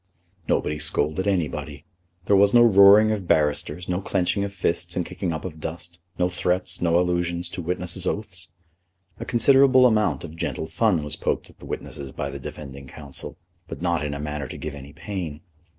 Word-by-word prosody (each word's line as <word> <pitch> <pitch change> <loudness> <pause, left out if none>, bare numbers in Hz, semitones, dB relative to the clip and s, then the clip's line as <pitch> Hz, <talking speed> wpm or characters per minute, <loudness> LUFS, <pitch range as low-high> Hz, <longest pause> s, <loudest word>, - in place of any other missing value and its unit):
Nobody 75 0 0
scolded 75 +6 0
anybody. 75 -6 -2 0.4
There 100 - +4
was 100 +3 +5
no 120 - +8
roaring 105 0 +7
of 100 -5 -3
barristers, 75 +2 +1
no 90 +1 -1
clenching 95 +1 0
of 100 - -3
fists 85 -2 -2
and 90 - -1
kicking 90 -3 -4
up 80 +1 -5
of 80 -4 -7
dust, 85 +2 -7 0.2
no 90 - +2
threats, 90 0 -1
no 85 0 +3
allusions 85 -1 -1
to 90 - -6
witnesses' 90 +1 -2
oaths. 90 -6 -4 0.7
A - - -5
considerable 130 +1 +5
amount 110 -3 +2
of 80 -1 -8
gentle 80 - -3
fun 90 -1 +1
was 75 0 -5
poked - - -2
at - - -28
the - - -11
witnesses 70 -2 -6
by 70 +1 -4
the 70 - -7
defending 70 0 -9
counsel, 75 +1 -7 0.3
but - - -8
not 85 -4 0
in 75 -1 -3
a - - -6
manner 75 -2 -4
to - - -8
give 75 - -5
any 70 0 -10
pain. 80 -1 -6
85 Hz, 185 wpm, -24 LUFS, 75-95 Hz, 0.7 s, no